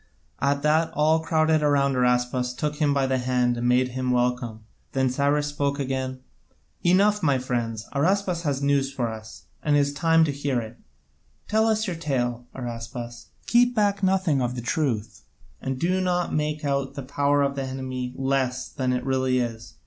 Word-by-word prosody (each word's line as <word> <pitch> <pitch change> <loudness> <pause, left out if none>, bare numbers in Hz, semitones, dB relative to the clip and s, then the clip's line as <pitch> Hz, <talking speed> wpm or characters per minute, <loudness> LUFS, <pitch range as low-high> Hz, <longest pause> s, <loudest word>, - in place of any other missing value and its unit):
At 140 +1 +1
that 160 +2 +3
all 155 +2 +3
crowded 160 -1 +2
round 140 -2 +2
Araspas 125 0 +1
and 125 - -8
took 150 +1 -2
him 150 -2 +2
by 140 -1 +2
the 130 -1 0
hand 125 -1 +1
and 120 0 -1
made 125 +1 +3
him 130 0 -3
welcome. 125 -2 0 0.3
Then 130 -1 +1
Cyrus 145 +2 +1
spoke 145 -1 -1
again: 130 -1 -3 0.6
"Enough, 200 +4 +4
my 140 -6 +3
friends, 120 -3 -3
Araspas 180 +4 +1
has 140 -4 -1
news 140 -1 +2
for 120 -4 -2
us, 110 -1 -9 0.2
and 150 -1 +2
it - - +5
is 140 0 +1
time 165 +2 +4
to 150 - -1
hear 140 -2 -1
it. 115 +1 -8 0.7
Tell 220 +1 +2
us 220 -1 +1
your 180 -5 -3
tale, 125 -6 -2
Araspas, 120 -1 -6 0.2
keep 245 +1 +3
back 205 -2 +2
nothing 190 -7 +2
of 125 0 -1
the 120 - -4
truth, 120 -4 -2 0.4
and 130 0 -3
do 185 +4 +1
not 180 -1 0
make 150 0 -1
out 140 -1 -1
the 140 - -5
power 140 +2 +1
of 140 0 0
the 140 - -3
enemy 130 -1 -4
less 130 -1 -1
than 130 -3 -1
it 125 0 -2
really 130 -1 +1
is. 115 -2 -4
135 Hz, 185 wpm, -25 LUFS, 125-150 Hz, 0.7 s, it